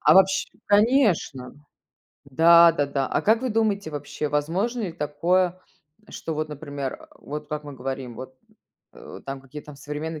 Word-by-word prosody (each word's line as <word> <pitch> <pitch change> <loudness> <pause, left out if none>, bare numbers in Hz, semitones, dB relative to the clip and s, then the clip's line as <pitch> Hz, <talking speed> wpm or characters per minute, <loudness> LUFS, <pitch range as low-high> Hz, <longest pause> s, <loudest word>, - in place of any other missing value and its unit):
А - - +5
вообщ 190 0 +4 0.2
Конечно! 205 - +2 0.7
Да-да-да. 150 -2 +5
А - - 0
как 220 +2 +3
вы 260 - 0
думаете, 210 -5 0
вообще 150 0 -4
возможно 175 +12 -1
ли 185 -5 -3
такое, 175 +4 0 0.5
что, 160 - -5
вот 155 0 -2
например, 145 -2 -5
э, - - -14
вот 150 +1 -7
как 150 0 -4
мы 145 - -8
говорим, 130 -1 -5
вот, 130 +2 -9 0.6
э, - - -11
там 135 0 -5
какие-то 145 +2 -11
современные 150 +3 -5
150 Hz, 145 wpm, -24 LUFS, 140-185 Hz, 0.7 s, А